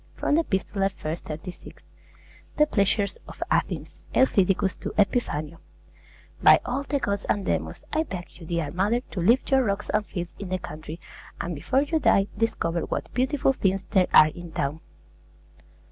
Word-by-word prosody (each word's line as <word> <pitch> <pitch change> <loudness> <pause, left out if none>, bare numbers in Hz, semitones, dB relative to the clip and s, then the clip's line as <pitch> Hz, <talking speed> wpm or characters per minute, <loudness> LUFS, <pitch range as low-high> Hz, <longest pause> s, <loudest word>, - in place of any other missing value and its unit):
From - - 0
the 330 +2 +4
'Epistolae,' 195 - -2
i. - - -1
36. 170 +2 -9 0.7
THE 300 - +6
PLEASURES 200 -5 +1
OF - - -5
ATHENS - - -1 0.2
EUTHYDICUS 195 -6 +3
TO - - -5
EPIPHANIO 165 -7 0 0.8
By - - +8
all 255 +3 -1
the 285 0 -1
gods 200 -6 -1
and 200 -2 +1
demons, - - -2
I 315 - +3
beg 185 - -7
you, 165 - -10
dear 170 -3 -1
mother, 205 +7 +1
to 210 - -7
leave 235 +9 +3
your 265 -1 +5
rocks 200 -2 -2
and 210 - +2
fields 175 -4 -6
in 200 -2 -6
the 185 - 0
country, 155 -1 -8 0.4
and 175 - -3
before 260 - +1
you 315 +2 0
die, 195 -9 +4
discover 200 -6 0
what - - -4
beautiful 270 +2 +2
things 195 -5 0
there 190 -3 +4
are 155 - +8
in 175 +1 -10
town. 140 +3 -2
195 Hz, 165 wpm, -26 LUFS, 175-245 Hz, 0.8 s, By